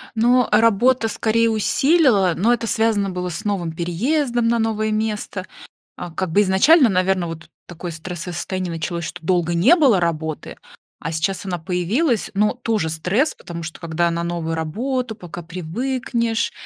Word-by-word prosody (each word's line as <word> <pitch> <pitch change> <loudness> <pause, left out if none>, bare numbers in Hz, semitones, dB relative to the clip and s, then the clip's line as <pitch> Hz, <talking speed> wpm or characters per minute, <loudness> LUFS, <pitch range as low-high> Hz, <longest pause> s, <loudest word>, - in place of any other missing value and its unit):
Ну, 245 +2 +4
а, 210 - +4
работа 230 +2 +3
скорее 230 +1 +1
усилила, 225 - +3
но 225 +7 +3
это 230 -1 -2
связано 220 -3 +1
было 180 -1 -3
с 180 +6 -6
новым 190 -5 -1
переездом 235 - 0
на 235 0 +2
новое 215 -1 0
место. 215 -3 -3 0.5
А, 175 - -7
как 180 +1 -3
бы 200 - +4
изначально, 240 - +5
наверно, 185 -2 +1
вот 165 -1 -8 0.2
такое 175 0 -7
стрессовое 175 +2 -6
состояние 185 +1 -3
началось, 165 +1 -3
что 170 0 -8
долго 175 -1 +1
не 210 - +5
было 265 - +4
работы, 160 -2 -3 0.4
а 165 - -5
сейчас 175 +5 -2
она 180 -2 -3
появилась, 195 - 0
но 210 +1 +1
тоже 225 -8 -1
стресс, 180 - 0
потому 170 -1 -8
что 160 0 -7
когда 170 0 0
на 170 0 -2
новую 170 -1 -3
работу, 230 - -2
пока 175 -4 -9
привыкнешь, 230 +7 -2
190 Hz, 160 wpm, -21 LUFS, 170-230 Hz, 0.5 s, изначально